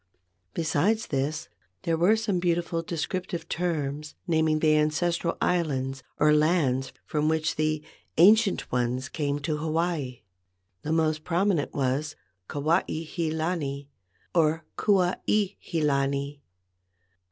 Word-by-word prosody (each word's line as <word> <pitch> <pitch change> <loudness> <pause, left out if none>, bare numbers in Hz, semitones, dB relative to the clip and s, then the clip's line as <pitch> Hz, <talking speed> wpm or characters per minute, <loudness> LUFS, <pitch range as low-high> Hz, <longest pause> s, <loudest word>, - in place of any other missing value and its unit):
Besides 175 +7 +1
this, 145 +2 -2 0.4
there 165 -2 +1
were 175 +7 +4
some 215 -5 0
beautiful 170 -1 0
descriptive 170 +1 -4
terms 150 -4 -2
naming 160 -3 +2
the 155 0 +3
ancestral 165 +3 +1
islands 135 -6 0 0.2
or 150 0 +5
lands 150 -5 +2
from 150 0 0
which 160 0 0
the 155 0 0 0.3
"ancient 210 +3 +5
ones 125 +2 -1
came 145 -3 -1
to 150 +2 -1
Hawaii." 155 -4 -2 0.6
The 155 - -3
most 155 -1 +1
prominent 175 -3 0
was 140 +3 -1 0.3
Kuai 155 +5 +2 0.2
he 165 0 -2
lani 155 -4 -2 0.4
or 160 -1 +2
Kua 190 -3 +2
i 205 -2 +2
he 165 -2 -3
lani. 140 0 0
155 Hz, 120 wpm, -27 LUFS, 145-175 Hz, 0.6 s, or